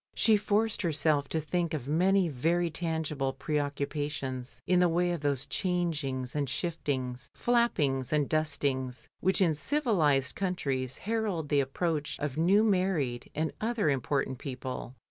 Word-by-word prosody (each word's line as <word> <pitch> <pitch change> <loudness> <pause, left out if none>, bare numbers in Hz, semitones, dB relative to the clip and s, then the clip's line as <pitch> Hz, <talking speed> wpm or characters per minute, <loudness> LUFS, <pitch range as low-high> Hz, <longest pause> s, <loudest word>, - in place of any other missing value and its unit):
She 220 - +5
forced 210 +1 +1
herself 150 -4 +1
to 160 - 0
think 165 +1 -1
of 135 -4 -5
many 185 +5 +3
very 165 +5 +1
tangible 155 -5 -2
preoccupations 145 -3 -3
in 180 -1 +3
the 180 -1 +4
way 175 +1 +2
of 170 -4 -3
those 140 -3 0
changings 155 - -1
and 145 -3 0
shiftings, 130 -4 -2
flappings 150 - +1
and 150 -2 +2
dustings, 140 -4 -1
which 190 +2 +2
in 170 -4 +4
civilised 155 - +1
coimtrieS 135 -9 -2
herald 205 -8 -2
the 145 -1 +4
ap 135 0 -5
proach 160 -4 -1
of 145 -3 -3
new 185 +7 +4
married 180 - +1
and 155 +1 -1
other 220 -8 +1
important 135 -1 -1
people. 130 -1 -6
155 Hz, 145 wpm, -30 LUFS, 135-180 Hz, -, She